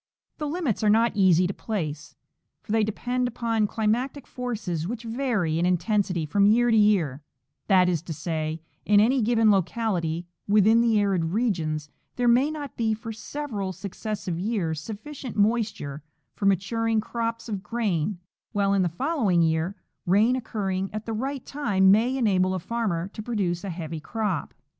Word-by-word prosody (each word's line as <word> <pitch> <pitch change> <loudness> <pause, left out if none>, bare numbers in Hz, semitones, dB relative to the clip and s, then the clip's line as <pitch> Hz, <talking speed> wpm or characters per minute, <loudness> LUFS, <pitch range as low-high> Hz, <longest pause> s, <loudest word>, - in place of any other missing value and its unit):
The 300 - -2
limits 295 - -1
are 210 - +4
not 225 +2 +4
easy 185 -3 +4
to 185 - -1
place, 160 -10 -4 0.5
for - - -8
they 220 0 +3
depend 245 +4 -1
upon 230 -3 0
climatic 235 +6 -1
forces 205 -10 -4
which 235 +2 -5
vary 225 - 0
in 175 - +2
intensity 185 -2 +1
from 200 +7 +3
year 240 +3 +4
to - - +4
year 190 -10 +3 0.2
— 135 +3 -53
that 185 -3 +5
is 170 -4 +1
to 170 - -8
say, 155 0 -3 0.2
in 205 0 +5
aay 245 +3 +3
given 225 -1 +4
locality 180 -4 0 0.2
within 215 +3 +5
the 230 -2 +3
arid 195 -5 +1
regions 165 -6 -1 0.3
there 245 -1 +1
may 250 +5 +4
not 295 -4 -6
be 220 -2 +1
for 225 +1 -7
several 220 -5 -4
successive 195 -1 -5
years 180 -7 -1
sufficient 230 - -7
moisture 205 -9 0 0.3
for 200 - -1
maturing 225 +4 +1
crops 230 +1 -3
of 205 -4 -3
grain, 205 -5 -1 0.4
while 200 -1 +2
in 195 - +3
the 180 - +1
following 205 - +1
year 160 +4 0 0.3
rain 210 +7 +4
occurring 195 -6 -2
at 215 0 -5
the 225 - -3
right 265 +4 -3
time 200 -10 +3
may 235 +6 +3
enable 190 -6 +2
a - - -2
farmer 190 -4 -2
to 215 - -8
produce 200 -6 -2
a 200 - -4
heavy 165 -2 -5
crop. 205 +1 -3
210 Hz, 165 wpm, -26 LUFS, 180-230 Hz, 0.5 s, that